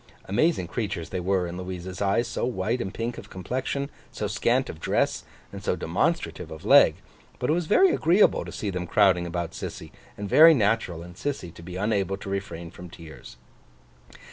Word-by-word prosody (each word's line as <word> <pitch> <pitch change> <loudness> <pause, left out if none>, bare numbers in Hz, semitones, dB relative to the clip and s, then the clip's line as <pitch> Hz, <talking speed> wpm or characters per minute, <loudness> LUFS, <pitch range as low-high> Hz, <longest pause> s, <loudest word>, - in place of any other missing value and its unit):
Amazing 120 - +1
creatures 100 -5 -4
they 95 - -3
were 95 0 +1
in 85 0 -6
Louisa's 90 0 -6
eyes, 100 +4 +2
so - - -3
white 120 +1 -1
and 95 - -3
pink 115 +3 -4
of - - -12
complexion, 130 - -3 0.2
so 105 - -4
scant 120 +6 +1
of 80 - -8
dress, - - 0 0.3
and - - -8
so - - 0
demonstrative - - -1
of 80 0 -10
leg; - - +7 0.4
but 125 - 0
it - - +4
was 170 -1 -1
very 370 - +5
agreeable 175 +6 +3
to - - -8
see 105 - -3
them 90 -1 -4
crowding 90 -2 +3
about 85 -1 -3
Sissy, - - -7 0.3
and 100 - -4
very 160 +9 +8
natural 105 - 0
in 90 0 -11
Sissy 90 - -4
to 85 - -13
be 90 +1 -8
unable 100 -1 0
to 100 0 -7
refrain 85 -4 -5
from 90 0 -11
tears. 80 -7 -12
100 Hz, 190 wpm, -26 LUFS, 90-120 Hz, 0.4 s, very